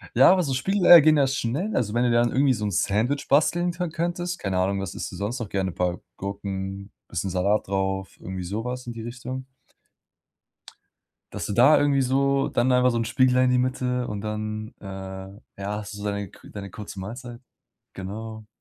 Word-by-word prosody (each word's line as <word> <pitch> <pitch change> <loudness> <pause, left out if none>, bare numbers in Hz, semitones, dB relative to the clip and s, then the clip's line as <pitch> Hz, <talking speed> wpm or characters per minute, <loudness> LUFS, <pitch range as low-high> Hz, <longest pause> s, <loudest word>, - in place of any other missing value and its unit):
Ja, 130 +7 +8
aber 185 -1 +3
so 140 -4 -1
Spiegelei 175 +4 +7
gehen 155 +1 +5
ja 140 -2 +4
schnell, 135 - -2
also 105 -4 0
wenn 120 +1 +2
du 120 - +2
dann 120 0 +3
irgendwie 135 0 +3
so 105 -3 -3
'n 105 - -1
Sandwich 110 +9 0
basteln 175 +5 +3
kö 175 0 -3
könntest, 175 +2 -2
keine 95 -2 -2
Ahnung, 95 +1 0
was 95 -1 -5
isst - - -5
du - - -8
sonst 105 +7 -3
noch 115 -4 -5
gerne? 95 -1 -1
Paar 90 0 -1 0.2
Gurken, 100 0 -5 0.2
bisschen 90 +2 -3
Salat 95 +4 +1
drauf, 95 0 -2
irgendwie 95 0 -5
so 100 +5 -3
was 125 0 -4
in 120 - -4
die 115 - -7
Richtung? 125 +2 -6 1.9
Dass - - -4
du - - -3
da 125 +8 +6
irgendwie 145 -1 +3
so 135 +1 +2
dann 120 +2 +1
einfach 125 0 +4
so 120 - -1
'n 115 - 0
Spiegelei 130 +2 +3
in 125 - +3
die 125 - +3
Mitte 125 0 0
und 105 -3 -4
dann, 110 +1 -4
äh, - - -16
ja, 95 0 -8 0.4
hast 105 -1 -7
du 100 - -8
deine 100 -1 -2
kü - - -16
deine 100 -1 -7
kurze 100 0 -8
Mahlzeit? 120 +5 -7 0.6
Genau. 110 +3 -7
115 Hz, 200 wpm, -25 LUFS, 100-130 Hz, 1.9 s, Ja